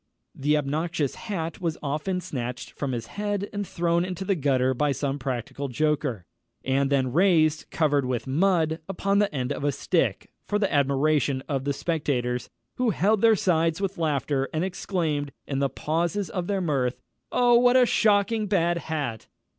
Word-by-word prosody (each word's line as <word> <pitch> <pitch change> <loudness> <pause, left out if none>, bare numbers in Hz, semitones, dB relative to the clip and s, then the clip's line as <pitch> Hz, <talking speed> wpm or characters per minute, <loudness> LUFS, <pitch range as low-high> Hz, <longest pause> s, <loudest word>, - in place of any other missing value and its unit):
The 150 +2 +1
obnoxious 150 0 -1
hat 170 -8 -5
was 165 -3 -1
often 155 +6 -2
snatched 125 -5 -5
from 140 -2 -4
his 120 -2 -3
head 205 - -3
and 205 -1 -3
thrown 170 0 +1
into 185 +1 -4
the 195 - +2
gutter 130 -5 +1
by 145 +3 +1
some 140 0 -2
practical 130 +2 -4
joker, 135 - -1 0.4
and 135 +1 +1
then 130 -3 +1
raised, 160 -3 +3
covered 145 -4 +1
with 125 -2 -2
mud, 160 +2 +2
upon 195 +1 +1
the 205 -1 +2
end 130 -3 -2
of - - -6
a 145 - +2
stick, - - -1 0.2
for 205 - +1
the 200 -4 0
admiration 140 -1 +2
of 135 -2 -2
the 140 - +1
spectators, 130 -6 -1 0.3
who 250 -2 +2
held 210 +1 +2
their 225 -1 +6
sides 165 -3 +1
with 195 -2 -3
laughter, 140 -3 0
and 160 +2 -1
exclaimed, 165 -6 -2
in 135 -1 -2
the 140 0 +1
pauses 170 +8 -1
of 180 -2 -3
their 200 -2 0
mirth, 135 -7 0 0.3
"_Oh, 240 -1 +5
what 245 +1 +5
a 255 - +6
shocking 215 -1 +2
bad 175 -3 +1
hat! 145 -10 -4
155 Hz, 170 wpm, -26 LUFS, 140-190 Hz, 0.4 s, their